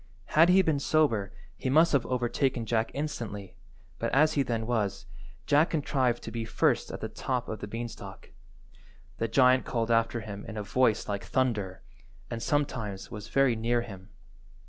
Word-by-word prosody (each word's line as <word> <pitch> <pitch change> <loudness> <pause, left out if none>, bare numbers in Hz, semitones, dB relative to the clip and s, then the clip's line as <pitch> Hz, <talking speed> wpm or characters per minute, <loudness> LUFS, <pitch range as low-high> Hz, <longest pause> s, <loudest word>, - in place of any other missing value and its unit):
Had 165 +3 +6
he 190 +1 +6
been 155 -4 +1
sober 140 -10 +1 0.2
he 130 - -3
must 160 +5 +5
have 140 - +2
overtaken 125 0 0
Jack 115 0 0
instantly, 115 -10 -5 0.4
but - - -1
as 155 +3 +4
he 145 - +2
then 115 -4 -1
was, 105 -6 -1 0.4
Jack 150 +3 +4
contrived 130 -6 0
to 115 - -6
be 115 0 -3
first 110 - +1
at - - -7
the - - -2
top 125 -2 -3
of 110 - -5
the 100 - -6
beanstalk. 115 +2 -7 0.9
The 115 - 0
giant 130 +2 +4
called 115 -2 -1
after 115 0 +2
him 100 -2 -7
in 110 - -7
a 105 - -3
voice 115 0 +1
like 100 -1 -3
thunder, 105 -8 -1 0.5
and 115 - -4
sometimes 120 -9 -2
was 105 -2 -7
very 135 0 +3
near 120 +2 +1
him. 95 -4 -11
120 Hz, 170 wpm, -29 LUFS, 110-135 Hz, 0.9 s, Had